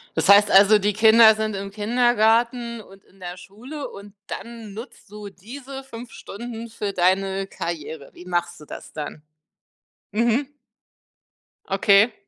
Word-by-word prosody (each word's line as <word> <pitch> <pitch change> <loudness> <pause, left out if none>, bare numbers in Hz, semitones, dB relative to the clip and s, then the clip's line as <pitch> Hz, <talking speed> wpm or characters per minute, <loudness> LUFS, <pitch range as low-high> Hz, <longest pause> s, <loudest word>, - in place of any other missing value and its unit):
Das - - 0
heißt 205 0 +7
also, 205 +2 +7
die 205 +1 0
Kinder 220 +1 +7
sind 215 -1 -3
im 195 0 -6
Kindergarten 235 +1 +1
und 195 -1 -17
in 195 - -25
der 180 0 -7
Schule 250 +11 -9
und 200 0 -12
dann 230 -3 -8
nutzt 225 -1 -11
du 210 -1 -9
diese 265 +8 -10
5 235 -2 -10
Stunden 230 +1 -8
für 210 -3 -4
deine 190 +2 +1
Karriere. 160 -5 -6
Wie 180 - -13
machst 175 -1 -2
du 150 - -13
das - - -10
dann? 150 0 -7 0.9
Mhm. 235 +5 +1 1.2
Okay. 200 +3 +4
210 Hz, 140 wpm, -22 LUFS, 195-235 Hz, 1.2 s, heißt